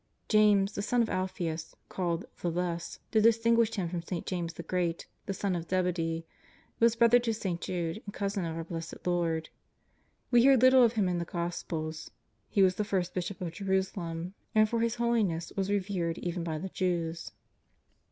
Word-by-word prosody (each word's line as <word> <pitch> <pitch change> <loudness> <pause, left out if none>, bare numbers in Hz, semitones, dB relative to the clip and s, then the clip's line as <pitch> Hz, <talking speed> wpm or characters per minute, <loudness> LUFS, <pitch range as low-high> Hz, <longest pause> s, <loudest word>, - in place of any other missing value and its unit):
James, 210 -2 +5
the 200 - -3
son 235 +3 +2
of 225 - -3
Alphaeus, 170 -4 -3
called 175 -2 -2
" - - -27
the 175 - 0
Less," 170 0 -3
to 220 - +4
distinguish 230 0 +4
him 190 -5 -1
from 170 0 -3
St. 170 0 -5
James 170 -3 -3
the 170 - -7
Great, 170 0 -1 0.2
the 195 - -1
son 195 -1 -1
of 170 -1 -5
Zebedee, 165 -3 0 0.5
was 230 0 +4
brother 235 +1 +6
to 235 -1 -1
St. 190 -6 -3
Jude 175 +2 -3
and 205 - -7
cousin 200 -1 -2
of 165 -1 -3
our 165 - -3
Blessed 165 0 -7
Lord. 170 -2 0 0.8
We 240 -1 +6
hear 270 +1 +7
little 255 +1 +7
of 230 -1 +4
him 210 -5 +1
in 175 -1 0
the - - -1
Gospels. 165 -3 -4 0.4
He 200 - +4
was 185 -1 +3
the 210 - +1
first 185 -3 -1
Bishop 185 +1 -4
of 175 -2 -3
Jerusalem, 185 -2 -2 0.2
and 215 0 +6
for 230 +1 -1
his 230 0 +1
holi 235 -1 +2
ness 165 -3 -2
was 195 0 -1
revered 185 -4 -1
even 175 -1 -3
by 160 -2 -2
the 190 +5 -5
Jews. 170 -3 -2
185 Hz, 190 wpm, -30 LUFS, 170-210 Hz, 0.8 s, hear